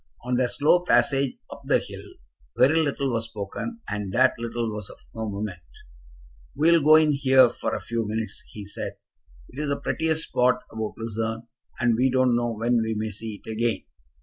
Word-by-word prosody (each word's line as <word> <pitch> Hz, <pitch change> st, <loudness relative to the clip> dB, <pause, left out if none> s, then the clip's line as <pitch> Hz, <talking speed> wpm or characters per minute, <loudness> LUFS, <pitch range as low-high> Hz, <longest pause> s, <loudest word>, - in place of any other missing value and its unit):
On 125 Hz, +1 st, -3 dB
their 125 Hz, 0 st, +2 dB
slow 150 Hz, +7 st, +3 dB
passage 140 Hz, -6 st, +2 dB
up -, -, -9 dB
the -, -, +3 dB
hill -, -, -7 dB, 0.6 s
very 155 Hz, +5 st, +5 dB
little 140 Hz, -3 st, -1 dB
was 115 Hz, -1 st, -1 dB
spoken, 115 Hz, -, -6 dB
and 100 Hz, -2 st, -3 dB
that 130 Hz, +2 st, +4 dB
little 115 Hz, -1 st, -3 dB
was 105 Hz, -2 st, -4 dB
of -, -, -12 dB, 0.2 s
no 110 Hz, -1 st, -4 dB
moment. 100 Hz, -3 st, -4 dB, 1.0 s
"We 160 Hz, +3 st, +4 dB
will 170 Hz, -1 st, +5 dB
go 155 Hz, +2 st, +7 dB
in 155 Hz, -1 st, +5 dB
here 130 Hz, -3 st, +5 dB
for -, -, -3 dB
a -, -, -3 dB
few 115 Hz, -2 st, -3 dB
minutes," 110 Hz, -1 st, -4 dB
he 105 Hz, -2 st, -9 dB
said. 100 Hz, -, -6 dB, 0.6 s
"It 135 Hz, -, -10 dB
is 150 Hz, -1 st, -1 dB
the 140 Hz, -, -1 dB
prettiest 160 Hz, 0 st, 0 dB
spot 125 Hz, 0 st, +2 dB
about 110 Hz, -1 st, -4 dB
Lucerne, 115 Hz, 0 st, -3 dB, 0.4 s
and 120 Hz, -1 st, +3 dB
we 130 Hz, +3 st, +3 dB
don't 130 Hz, -1 st, +3 dB
know 120 Hz, 0 st, 0 dB
when 115 Hz, +2 st, +1 dB
we 110 Hz, 0 st, -1 dB
may 110 Hz, 0 st, -2 dB
see 110 Hz, +1 st, -7 dB
it -, -, -5 dB
again." 115 Hz, +1 st, -1 dB
120 Hz, 195 wpm, -25 LUFS, 110-135 Hz, 1.0 s, go